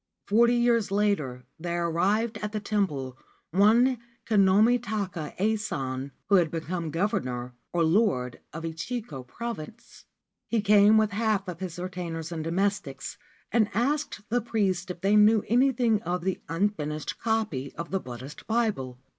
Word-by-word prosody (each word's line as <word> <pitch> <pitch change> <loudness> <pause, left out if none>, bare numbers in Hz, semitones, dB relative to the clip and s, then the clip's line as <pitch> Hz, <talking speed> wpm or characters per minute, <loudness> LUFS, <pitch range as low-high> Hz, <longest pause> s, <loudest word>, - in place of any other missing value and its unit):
Forty 235 +3 +4
years 235 -3 +2
later 195 - 0
there 170 0 -2
arrived 210 +7 +1
at 210 0 -4
the 215 - -1
temple 150 - -2 0.3
one 225 +7 +4 0.3
Kinomi 215 +3 +4
ta 215 -3 -2
ka 165 -5 -7
Ason, 145 -11 -1 0.2
who 200 - +5
had 170 -3 +3
become 165 +1 -3
Governor 130 - -2 0.2
or 170 -1 +1
Lord 160 - +1
of 165 +2 -7
Echigo 165 - -5
Province. 225 - -8 0.4
He 230 - +1
came 210 +1 +6
with 215 -1 +3
half 210 -2 0
of 175 -2 -6
his 180 -3 -5
retainers 175 -3 -5
and 160 -2 -3
domestics, 195 +5 -2 0.3
and 220 -3 +3
asked 275 0 0
the 245 +2 +1
priests 195 -5 -1
if 175 -1 -6
they 200 +3 +3
knew 210 0 +6
any 255 +4 +4
thing 230 -4 +1
of 180 -4 -2
the 190 0 -1
unfinished 165 -4 -2
copy 215 - -1
of 170 - -6
the 195 - +1
Buddhist 130 +1 -9
Bible. 215 - 0
195 Hz, 150 wpm, -27 LUFS, 165-220 Hz, 0.4 s, came